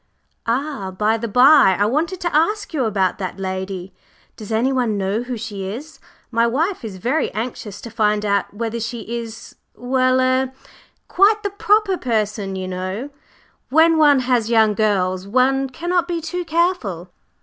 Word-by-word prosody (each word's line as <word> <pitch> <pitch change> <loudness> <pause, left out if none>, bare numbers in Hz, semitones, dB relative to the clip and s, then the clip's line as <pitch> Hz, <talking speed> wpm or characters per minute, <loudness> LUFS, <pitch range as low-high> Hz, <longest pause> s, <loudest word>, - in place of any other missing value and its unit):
"Ah, 255 -4 -2
by 210 +4 0
the 230 +1 -3
bye, 250 -4 +6
I 205 - +3
wanted 320 - -1
to 345 -3 -2
ask 405 +6 +1
you 270 -6 0
about 195 -4 0
that 185 0 -5
lady. 190 0 -5 0.4
Does 215 0 -9
anyone 240 -1 +1
know 200 +3 -1
who 245 0 -5
she 210 -3 -6
is? 270 +11 -7 0.3
My 230 0 +2
wife 320 - -1
is 205 -4 -6
very 250 - 0
anxious 220 -3 -5
to 230 - -9
find 210 -1 +1
out 200 -1 0
whether 230 +2 -4
she 230 +1 -4 0.2
is 225 -1 -9 0.2
well 255 +1 +1
er 260 0 +1 0.5
quite 420 +3 +3
the 405 - -2
proper 415 -1 +2
person, 210 -5 -1
you 185 -1 -4
know! 185 +9 -4 0.6
When 320 +3 +5
one 290 -3 +5
has 245 -3 +1
young 220 -2 +4
girls, 190 -3 0
one 265 +4 +2
cannot 345 +5 -1
be 345 -2 -2
too 355 +2 -4
careful." 310 - -1
235 Hz, 160 wpm, -20 LUFS, 205-295 Hz, 0.6 s, bye